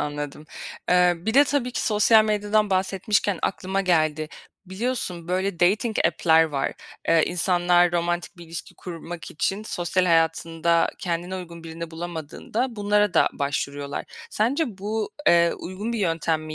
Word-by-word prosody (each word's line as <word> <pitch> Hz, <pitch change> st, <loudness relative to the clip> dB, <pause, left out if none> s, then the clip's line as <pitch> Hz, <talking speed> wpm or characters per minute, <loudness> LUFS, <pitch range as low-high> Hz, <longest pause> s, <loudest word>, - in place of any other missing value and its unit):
Anladım. 145 Hz, 0 st, -4 dB, 0.4 s
Eee, 180 Hz, 0 st, +5 dB
bir 215 Hz, +8 st, -3 dB
de 285 Hz, -, +7 dB
tabii 265 Hz, -3 st, -1 dB
ki -, -, -2 dB
sosyal 215 Hz, +1 st, +5 dB
medyadan 210 Hz, 0 st, +1 dB
bahsetmişken 195 Hz, +1 st, +1 dB
aklıma 190 Hz, +1 st, -1 dB
geldi. 155 Hz, -4 st, +1 dB, 0.4 s
Biliyorsun, 190 Hz, -4 st, -3 dB
böyle, 185 Hz, 0 st, -1 dB
dating 210 Hz, +5 st, +2 dB
app'ler 160 Hz, -1 st, +4 dB
var. 140 Hz, -4 st, -2 dB, 0.4 s
Eee, 165 Hz, -1 st, +5 dB
insanlar 175 Hz, 0 st, +3 dB
romantik 175 Hz, +1 st, -1 dB
bir 175 Hz, -, -11 dB
ilişki 165 Hz, 0 st, -8 dB
kurmak 170 Hz, -1 st, -8 dB
için 195 Hz, +7 st, -1 dB
sosyal 180 Hz, 0 st, 0 dB
hayatında 165 Hz, 0 st, +2 dB
kendine 175 Hz, +1 st, -3 dB
uygun 170 Hz, -2 st, -9 dB
birini 165 Hz, 0 st, -7 dB
bulamadığında 175 Hz, -, -4 dB
bunlara 205 Hz, -1 st, +2 dB
da -, -, +5 dB
başvuruyorlar. 140 Hz, 0 st, -3 dB, 0.3 s
Sence 235 Hz, -, 0 dB
bu, 210 Hz, +2 st, -3 dB, 0.2 s
eee, 170 Hz, 0 st, +5 dB
uygun 200 Hz, +6 st, -5 dB
bir 230 Hz, -, -2 dB
yöntem 165 Hz, -4 st, 0 dB
mi 155 Hz, 0 st, -7 dB
175 Hz, 140 wpm, -24 LUFS, 165-205 Hz, 0.4 s, de